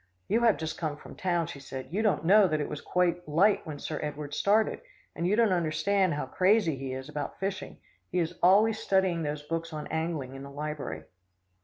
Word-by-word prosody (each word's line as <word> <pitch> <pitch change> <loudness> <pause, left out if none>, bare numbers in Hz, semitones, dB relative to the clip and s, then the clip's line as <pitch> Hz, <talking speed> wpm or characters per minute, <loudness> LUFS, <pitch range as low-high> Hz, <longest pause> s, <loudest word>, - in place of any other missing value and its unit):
"You 220 +4 +2
have 230 -3 +4
just 160 -1 -4
come 155 -3 -2
from - - -12
town," 175 -3 0
she 150 -3 -8
said, 135 -1 -7
"you 205 - +1
don't 210 -6 +1
know 200 +3 +6
that 155 -3 0
it 145 - -2
was 150 - -6
quite 175 -2 0
light 190 +7 +3
when 150 -2 -5
Sir - - -4
Edward 150 -1 -5
started, 210 +7 +2 0.3
and 170 - -1
you 200 - +3
don't 225 -2 +3
understand 175 +2 +1
how 145 - -2
crazy 185 +2 +2
he 135 0 -5
is 130 0 -5
about 150 -1 -5
fishing. 195 0 -4 0.3
He 180 - -3
is 170 -2 0
always 210 +5 +5
studying 190 -3 +1
those 150 -1 -3
books 165 +2 -3
on 150 -1 -5
angling 160 -5 -2
in 135 - -8
the 140 - -8
library." 145 - -5
165 Hz, 210 wpm, -29 LUFS, 150-190 Hz, 0.3 s, know